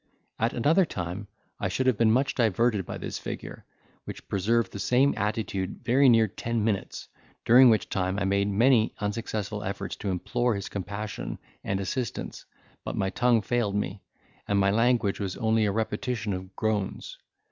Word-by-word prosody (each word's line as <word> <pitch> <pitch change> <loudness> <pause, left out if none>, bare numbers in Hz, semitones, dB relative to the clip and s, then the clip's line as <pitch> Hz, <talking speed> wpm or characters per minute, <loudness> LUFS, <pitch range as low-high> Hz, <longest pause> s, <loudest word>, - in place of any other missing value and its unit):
At 115 +1 +1
another 155 +10 +3
time 95 - -5 0.3
I 100 - 0
should 95 +8 -1
have 130 -2 +4
been 115 -2 +5
much 130 +4 +2
diverted 115 -3 +1
by - - -5
this - - -5
figure, - - -7 0.4
which - - -9
preserved 110 +2 +1
the 100 - -7
same 125 +7 +3
attitude 105 -3 -2
very 130 +3 +5
near 115 -2 +5
ten 115 +2 -3
minutes, 105 -3 -2 0.4
during 125 +2 +8
which 110 -2 +2
time 95 0 -1
I 100 - 0
made 100 +1 +1
many 115 +3 +3
unsuccessful 105 0 -3
efforts 95 - -4
to 100 - -4
implore 115 +6 0
his 100 - -5
compassion 100 +2 -5 0.3
and 95 0 -1
assistance; 115 +6 -4 0.4
but - - -4
my 95 -1 0
tongue 120 -2 +2
failed 115 -4 0
me, 100 -1 -2 0.5
and 100 - +1
my 100 0 +3
language 115 -2 +2
was 95 -3 -3
only 110 -1 +2
a - - +1
repetition 110 0 -2
of 95 +1 -7
groans. 105 -3 -2
105 Hz, 170 wpm, -27 LUFS, 100-120 Hz, 0.5 s, during